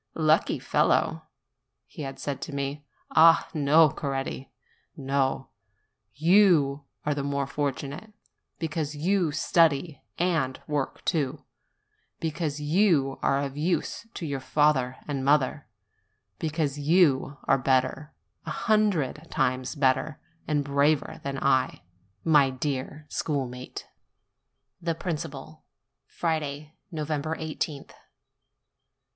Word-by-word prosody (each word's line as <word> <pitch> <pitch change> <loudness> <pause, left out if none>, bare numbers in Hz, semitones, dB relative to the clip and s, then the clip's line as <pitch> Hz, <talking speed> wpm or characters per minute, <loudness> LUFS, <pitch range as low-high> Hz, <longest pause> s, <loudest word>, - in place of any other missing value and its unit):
"Lucky 155 0 +3
fellow!" - - +1 0.6
he - - -10
had 135 -2 -5
said 140 -2 -4
to 145 - -6
me. 140 +1 -4 0.2
Ah, 165 +1 +6
no, 155 +1 +5
Coretti, 135 -2 -4 0.5
no; 135 -1 -1 0.7
you 155 -4 +4 0.2
are 150 - +1
the 145 - -2
more 140 0 -1
fortunate, 145 +7 -4 0.5
because 155 -2 -3
you 175 +1 +1
study 155 -1 +2 0.2
and 165 -7 0
work 145 -3 -3
too; 150 -3 -1 0.7
because 155 -2 -2
you 150 -3 +2
are 135 - +2
of 140 -1 -4
use 170 +8 -1
to 170 - -4
your 140 -3 -2
father 130 -2 +2
and 145 -2 -2
your - - -4
mother; 140 0 +2 0.7
because 155 -3 -1
you 145 -3 +3
are 135 - +3
better 130 +4 +1 0.4
a - - -2
hundred 185 - +1
times 130 +3 -1
better 140 +2 +1 0.3
and 150 -2 +1
braver 140 +2 +1
than 140 -1 -3
I, 130 -5 +1 0.4
my 150 -4 +5
dear 135 +2 -4
schoolmate! 130 -5 -4 1.0
THE 165 -1 -1
PRINCIPAL 155 -3 -6 0.4
Friday, 155 -2 -3 0.2
i8th. 155 -1 -3
145 Hz, 105 wpm, -27 LUFS, 135-160 Hz, 1.0 s, Ah